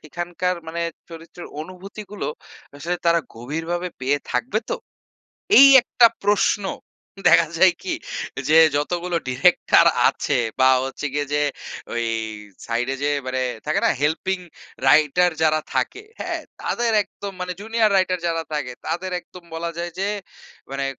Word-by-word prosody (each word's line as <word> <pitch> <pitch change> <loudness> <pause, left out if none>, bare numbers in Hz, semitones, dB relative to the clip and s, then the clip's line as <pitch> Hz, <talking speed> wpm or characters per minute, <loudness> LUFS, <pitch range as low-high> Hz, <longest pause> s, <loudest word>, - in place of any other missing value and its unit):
সেখানকার 175 +3 -3
মানে 170 +1 -3 0.3
চরিত্রের 165 +1 -10
অনুভূতিগুলো 195 +4 -8 0.5
আসলে 175 +5 -3
তারা 170 0 +4
গভীরভাবে 165 +9 -4
পেয়ে 135 +3 +1
থাকবে 240 -3 0
তো? - - 0 0.8
এই 275 - +11
একটা 235 0 +5 0.2
প্রশ্ন, 205 0 +2 0.7
দেখা 165 +1 +6
যায় 185 +1 +6
কি? 190 - -2 0.6
যে, 160 - +6 0.2
যতগুলো 175 +4 -1
ডিরেক্টর 130 +8 +4 0.2
আছে 145 - -1 0.2
বা 130 0 +6 0.2
হচ্ছে 135 +2 -6
গিয়ে 145 0 -1
যে 150 - +2 0.5
ওই 120 0 -1 0.6
সাইড 115 +2 -1
এ - - -3
যে 145 - +2 0.2
মানে, 130 0 -1 0.2
থাকে 155 - +1
না - - +5
হেল্পিং 175 +6 0 0.5
রাইটার 155 +5 +4
যারা 155 0 +3
থাকে, 425 - -1 0.2
হ্যাঁ? - - -3 0.2
তাদের 235 -1 0
একদম 200 0 -8
মানে 180 0 -3
জুনিয়র 225 0 +1
রাইটার 185 -1 +1
যারা 165 -1 -1
থাকে, 150 -4 -2 0.2
তাদের 185 +2 -3
একদম 180 0 -15
বলা 170 +1 -3
যায় 175 0 -4
যে 195 - 0 0.6
মানে 135 0 -2
170 Hz, 140 wpm, -22 LUFS, 150-185 Hz, 0.8 s, এই